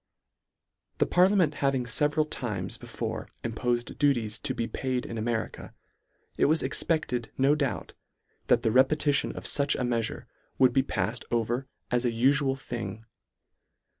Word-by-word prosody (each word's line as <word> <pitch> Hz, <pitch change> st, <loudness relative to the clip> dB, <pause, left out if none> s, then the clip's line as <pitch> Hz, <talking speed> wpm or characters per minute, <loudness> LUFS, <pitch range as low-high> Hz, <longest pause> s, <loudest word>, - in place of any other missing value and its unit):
The -, -, +3 dB
parliament 180 Hz, -3 st, +4 dB
having 135 Hz, -2 st, +2 dB
feveral 150 Hz, +6 st, +1 dB
times 105 Hz, -, -4 dB
be -, -, -11 dB
fore -, -, -4 dB
impofed 120 Hz, +1 st, -2 dB
duties 120 Hz, -7 st, +1 dB
to 135 Hz, -3 st, -2 dB
be 115 Hz, -, -1 dB
paid 130 Hz, -2 st, -2 dB
in 115 Hz, -, -6 dB
America, 115 Hz, 0 st, -3 dB, 0.6 s
it -, -, +4 dB
was 155 Hz, +3 st, +3 dB
expected 125 Hz, -8 st, -1 dB
no 135 Hz, +2 st, +4 dB
doubt, 145 Hz, -3 st, -2 dB, 0.5 s
that -, -, +4 dB
the 110 Hz, -, +2 dB
repeti 145 Hz, +4 st, +4 dB
tion -, -, 0 dB
of -, -, -6 dB
fuch 140 Hz, -1 st, +2 dB
a -, -, 0 dB
meafure 115 Hz, -2 st, -2 dB, 0.3 s
would 130 Hz, -2 st, +5 dB
be 135 Hz, -, +4 dB
paifed 125 Hz, -2 st, -2 dB
over 120 Hz, +3 st, -1 dB, 0.2 s
as 120 Hz, 0 st, +2 dB
an 120 Hz, -, +1 dB
ufual 135 Hz, +3 st, +2 dB
thing. 115 Hz, -4 st, -6 dB
125 Hz, 150 wpm, -28 LUFS, 115-140 Hz, 0.6 s, would